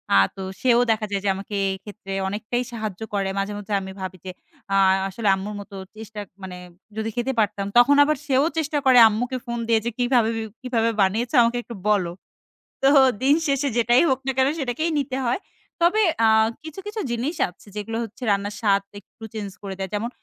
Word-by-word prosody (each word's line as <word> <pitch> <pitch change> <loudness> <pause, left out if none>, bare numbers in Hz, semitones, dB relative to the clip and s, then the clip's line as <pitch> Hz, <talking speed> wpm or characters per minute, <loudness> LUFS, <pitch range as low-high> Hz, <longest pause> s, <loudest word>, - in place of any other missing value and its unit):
আ - - +7 0.2
তো 195 - -7 0.2
সেও 245 -2 +4
দেখা 220 -1 0
যায় 200 -1 -1
যে 195 - +3
আমাকে 200 +2 -6 0.2
এই 190 - -4
ক্ষেত্রে 205 -2 -10 0.2
অনেকটাই 215 +5 -2
সাহায্য 215 -3 -5
করে। 195 -1 0
মাঝে, 200 +1 -2
মাঝে 205 0 -6
আমি 190 - -7
ভাবি 185 0 -5
যে, 185 - -4 0.4
আ - - +3 0.3
আসলে 215 +2 -3
আম্মুর 200 +2 -5
মত 200 - -11 0.3
চেষ্টা 220 -1 -8 0.2
মানে 180 -1 -7 0.4
যদি 220 0 -2
খেতে 245 +2 0
পারতাম 200 -2 0
তখন 265 +4 +7
আবার 305 0 +1
সেও 275 +1 +3
চেষ্টা 305 -1 0
করে 255 -1 +6
আম্মুকে 245 +4 -1
ফোন 235 0 -3
দিয়ে 225 -1 +4
যে, - - +1
"কিভাবে, 245 -2 +2 0.3
কিভাবে 235 -3 +1
বানিয়েছো? 225 +8 +1
আমাকে 235 +1 +1
একটু 235 - -9
বলো।" 190 -5 +2 0.7
তো 270 - +4 0.4
দিন 280 +3 +5
শেষে 280 0 +1
যেটাই 240 +3 +4
হোক 260 - +1
না 270 - +3
কেনো 265 +2 +3
সেটাকেই 275 +5 -1
নিতে 265 -1 -3
হয়। 245 +6 0 0.4
তবে 365 +6 +4 0.2
আ - - +6 0.4
কিছু, 315 +4 -8
কিছু 425 +1 -5
জিনিস 250 +8 -2
আছে, 180 - -20
যেগুলো 215 +2 -4
হচ্ছে 230 +3 -9
রান্নার 200 +1 -1
স্বাদ 200 -3 +3 0.2
একটু 225 +3 -19
চেঞ্জ 210 -3 -4
করে 195 -1 -5
দেয়। 190 0 -3
যেমন 225 +3 -1
225 Hz, 195 wpm, -23 LUFS, 205-255 Hz, 0.7 s, আ